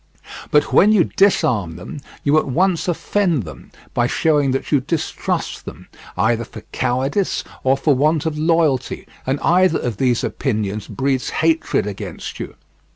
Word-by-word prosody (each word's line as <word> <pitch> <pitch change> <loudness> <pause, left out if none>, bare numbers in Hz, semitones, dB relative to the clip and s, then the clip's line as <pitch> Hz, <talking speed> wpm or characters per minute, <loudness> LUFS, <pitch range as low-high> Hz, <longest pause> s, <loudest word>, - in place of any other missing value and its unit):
But 150 0 +2
when 210 - +6
you 205 -5 +5
disarm 115 - +1
them, 95 - -8 0.2
you 150 +2 +4
at - - -4
once 175 +6 +1
offend 175 - 0
them 80 - -11 0.2
by 120 0 +2
showing 150 0 +2
that 135 +1 -2
you 145 - +4
distrust 155 +4 -3
them, - - -10 0.3
either 115 +1 +2
for - - -11
cowardice 135 +10 0 0.2
or 130 +1 +3
for 145 +2 +2
want 150 +4 +1
of 160 -1 -1
loyalty, 155 -5 +1 0.2
and 135 +2 0
either 180 0 +3
of 120 -5 -3
these 125 -1 +1
opinions 105 -5 -2
breeds 135 -1 -1
hatred 160 -7 +1
against 105 -2 -6
you. - - -6
140 Hz, 155 wpm, -20 LUFS, 125-165 Hz, 0.3 s, when